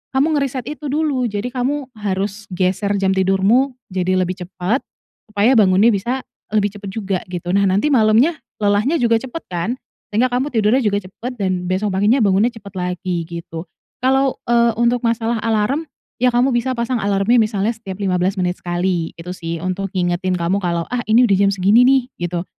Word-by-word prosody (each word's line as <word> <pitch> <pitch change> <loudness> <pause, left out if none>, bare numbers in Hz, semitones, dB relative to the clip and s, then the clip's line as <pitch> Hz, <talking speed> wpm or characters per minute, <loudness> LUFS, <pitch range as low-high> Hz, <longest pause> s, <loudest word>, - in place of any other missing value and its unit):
kamu 290 +4 +3
ngereset 265 -3 -3
itu 300 0 -6
dulu, 285 -3 0
jadi 210 +4 -3
kamu 265 +1 -2
harus 200 0 -3
geser 185 +2 0
jam 195 -1 +1
tidurmu, 195 +8 +2 0.2
jadi 185 0 +1
lebih 185 0 0
cepat. 190 +8 -1 0.5
Supaya, 215 +4 +3
bangunnya 200 +1 +5
bisa 240 +7 -2 0.3
lebih 205 -2 +1
cepat 200 -1 -7
juga, 195 -3 -2
gitu. 175 -1 -5
Nah, 200 0 +3
nanti 200 +10 +2
malamnya, 230 +6 +4 0.3
lelahnya 205 +10 +2
juga 230 -1 +3
cepat 265 +5 -7
kan, 175 +3 -2 0.4
sehingga 245 +5 +3
kamu 255 +4 0
tidurnya 220 +1 +3
juga 205 -1 +1
cepat 215 +7 -7
dan 185 -2 -1
besok 190 +3 0
paginya 210 +7 +3
bangunnya 205 +3 +3
cepat 205 -4 -12
lagi, 180 -1 -2
gitu. 170 -1 -7 0.4
Kalau, 265 +1 +2
eee, 235 0 +4
untuk 235 +1 +2
masalah 230 0 0
alarm, 225 +8 0 0.4
ya, 250 - +5
kamu 245 +2 +2
bisa 240 +2 0
pasang 235 0 -1
alarmnya 200 +4 +2
misalnya 215 0 0
setiap 200 -5 -8
15 190 0 0
menit 180 0 -1
sekali, 175 -1 -1
gitu 170 +2 -7
sih. 170 -2 -5
Untuk, 190 +2 -2
ngingetin 180 +1 0
kamu 180 +4 0
kalau, 170 -2 -1
"Ah, 245 - 0
ini 235 +3 +6
udah 200 - +3
jam - - +4
segini 200 +4 +4
nih." 265 -1 +4 0.3
gitu, 175 0 -3
205 Hz, 180 wpm, -19 LUFS, 185-245 Hz, 0.5 s, ini